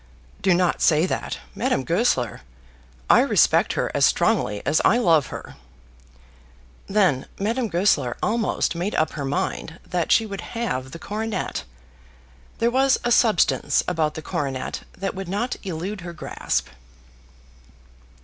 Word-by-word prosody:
"Do 185 -2 +4
not 180 0 +1
say 155 +1 +4
that, - - -3 0.2
Madame 135 - 0
Goesler. 165 - 0 0.7
I - - +6
respect - - +3
her - - -1
as - - +1
strongly 105 -1 +2
as 150 +3 +2
I 230 - +5
love 165 - +3
her." - - -9 1.3
Then 190 -10 +2
Madame 230 +5 0
Goesler 170 - +1
almost 220 -4 0
made 175 +5 -3
up 155 0 +1
her 145 -2 -4
mind 150 +4 -3
that 175 -2 -1
she 225 - +5
would 200 -3 -6 0.2
have 130 - -2
the 150 - -8
coronet. 215 +4 -4 0.9
There 235 +1 +1
was 265 +1 +3
a 240 - 0
substance 225 -5 +3
about 160 -4 0
the 160 - -6
coronet 135 -4 -3 0.2
that 195 +1 -3
would 190 -2 -6
not 220 +6 -1
elude 190 +2 -4
her 175 -1 -7
grasp. 155 - -3
180 Hz, 140 wpm, -23 LUFS, 155-215 Hz, 1.3 s, I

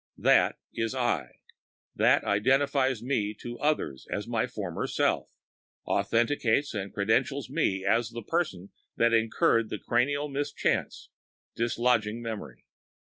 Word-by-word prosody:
That - - +4 0.2
is 115 -1 -2
I; - - -1 0.6
that - - +4
identifies 130 +3 +2
me 110 -5 -1 0.7
as 105 +2 -3
my 115 0 0
former 100 -9 -4
self—authenticates 120 +2 -1
and 100 -2 -4
credentials 120 +6 0
me 95 0 0
as 115 +3 +2
the 120 0 -7
person 100 - -2 0.3
that 115 0 +3
incurred 115 0 +2
the - - -3
cranial 145 +7 0
mischance, 145 0 -2 0.5
dislodging 115 -2 +1
memory. 115 -3 -7
115 Hz, 105 wpm, -28 LUFS, 105-135 Hz, 0.7 s, That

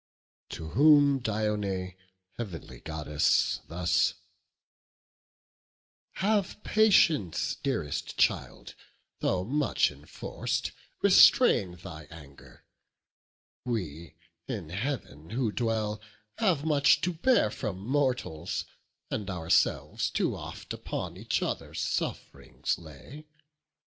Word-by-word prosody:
To 80 -1 -6
whom 145 - +5
Dione, 105 -5 -2 0.4
heav'nly 80 - -7
Goddess, 75 -1 +1
thus: 85 +1 +1 2.0
"Have 205 -1 0
patience, 165 - +3
dearest 105 - -3
child; - - 0 0.5
though 90 -1 0
much 140 +7 +1
enforc'd, - - -4 0.3
Restrain 90 -3 +6
thine 85 -4 -10
anger: 75 -4 -14 1.0
we, 85 - -4 0.3
in 100 -10 -5
Heav'n 95 - -4
who 115 0 -1
dwell, 110 0 -1 0.4
Have 175 -9 +2
much 150 -2 +4
to 180 - 0
bear 170 - +3
from 100 -3 -4
mortals; 120 - -1 0.5
and 105 -2 -3
ourselves 85 -3 +1
Too - - 0
oft - - -7
upon - - -5
each - - -1
other - - -4
suff'rings - - -3
lay. 85 - -12
105 Hz, 90 wpm, -29 LUFS, 85-140 Hz, 2.0 s, Restrain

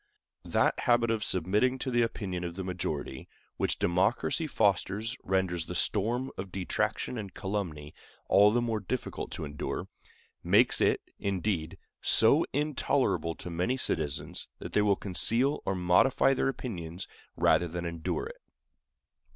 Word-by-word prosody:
That - - +2
habit 120 -2 +3
of 110 -2 0
submitting 105 +8 +1
to 130 0 -3
the 120 0 +3
opinion 95 -6 -2
of 85 -1 -5
the 95 - -4
majority 85 -7 -4 0.3
which - - 0
democracy 100 - +1
fosters 105 0 +1
renders 90 -3 0
the 90 - -5
storm 120 +9 0
of 95 -1 -5
detraction 95 +5 -2
and 100 -3 -6
calumny 85 -7 -4 0.3
all 100 +1 +6
the 120 +3 +1
more 115 -2 -1
difficult 95 - -4
to - - -4
endure—makes 75 0 -1
it, - - +3 0.2
indeed, 95 -4 -2 0.2
so - - +5
intolerable 145 - 0
to 90 - -8
many 90 +10 0
citizens, 75 - -2
that - - -8
they 105 - +4
will 105 -1 +3
conceal 115 +9 +1
or 95 - +1
modify 95 +10 +4
their 135 - +1
opinions 90 -10 -5 0.3
rather 85 - +3
than 85 +1 -5
endure 85 - -3
it. - - -10
95 Hz, 140 wpm, -29 LUFS, 90-120 Hz, 0.3 s, all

